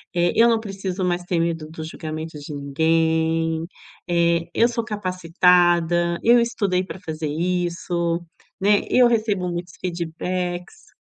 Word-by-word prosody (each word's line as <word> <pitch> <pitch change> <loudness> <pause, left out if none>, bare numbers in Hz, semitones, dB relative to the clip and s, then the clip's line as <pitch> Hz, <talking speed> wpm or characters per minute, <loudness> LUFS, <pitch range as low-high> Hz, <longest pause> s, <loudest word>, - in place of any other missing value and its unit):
eh, 175 0 +3
eu 230 - +6
não 225 -1 +3
preciso 195 -3 -4
mais 175 0 -1
ter 175 -1 -1
medo 165 -2 -1
do 160 0 -7
julgamento 155 0 -6
de 145 +1 -8
ninguém, 160 +2 +1 0.4
eh, 170 -1 +2
eu 235 - +4
sou 230 -1 -2
capacitada, 175 -3 +2
eu 240 +1 +6
estudei 200 -6 0
para 190 0 -8
fazer 160 -3 -5
isso, 170 +1 -1 0.4
né, 205 +1 +4
eu 250 -1 +5
recebo 215 -6 0
muitos 175 0 -5
feedbacks". 175 - -4
175 Hz, 135 wpm, -22 LUFS, 165-185 Hz, 0.4 s, eu